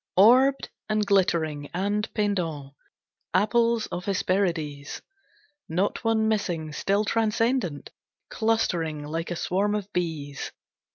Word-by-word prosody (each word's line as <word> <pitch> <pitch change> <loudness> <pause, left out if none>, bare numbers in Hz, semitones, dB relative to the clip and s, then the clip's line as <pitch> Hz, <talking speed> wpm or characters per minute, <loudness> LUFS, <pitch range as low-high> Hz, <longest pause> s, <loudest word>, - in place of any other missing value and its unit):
Orbed, 255 +7 +5 0.2
and 215 -1 +1
glittering, 160 -7 +1
and 205 +3 -1
pendent, 170 -10 -1 0.6
Apples 230 +3 +3
of 175 - -4
Hesperides! 175 -7 -1 0.7
Not 185 +5 0
one 225 -1 +2
missing, 175 -8 -1
still 200 +6 +1
transcendent, 225 - 0 0.4
Clustering 175 -9 0
like 165 +3 -4
a 175 - -2
swarm 200 +5 0
of 205 -1 -5
bees. 155 -5 -3
195 Hz, 105 wpm, -26 LUFS, 160-215 Hz, 0.7 s, Orbed